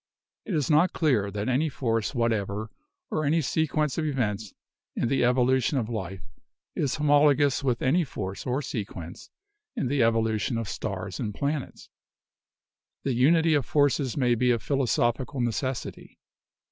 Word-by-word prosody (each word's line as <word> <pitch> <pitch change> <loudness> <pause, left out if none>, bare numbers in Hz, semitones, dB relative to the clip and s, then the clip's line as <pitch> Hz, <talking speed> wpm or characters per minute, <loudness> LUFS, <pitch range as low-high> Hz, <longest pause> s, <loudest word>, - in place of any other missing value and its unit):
It 195 - -2
is 150 -4 0
not 160 +4 +4
clear 125 - +1
that 100 +1 -4
any 135 +5 +1
force 115 -2 -1
whatever 110 -2 -1 0.4
or 155 - 0
any 155 +3 +2
sequence 155 0 0
of 155 - -1
events 110 -7 -2 0.4
in 115 - 0
the 135 - +2
evolution 125 +2 +2
of 115 -3 -1
life 95 -5 -5 0.5
is 130 -3 0
homologous 145 -1 +3
with 125 -4 0
any 165 +7 +3
force 100 -8 -6
or 130 +4 -1
sequence 95 -8 -6 0.5
in 135 - -1
the 140 -1 +1
evolution 115 0 +1
of 115 -2 -3
stars 95 -2 -5
and 105 -5 -3
planets. 140 -1 -3 1.2
The 135 - 0
unity 160 +6 +4
of 145 -2 +2
forces 145 -3 +1
may 125 -3 +3
be 125 +2 +2
a 120 - +3
philosophical 130 0 0
necessity. 120 +2 -3
125 Hz, 145 wpm, -26 LUFS, 110-145 Hz, 1.2 s, not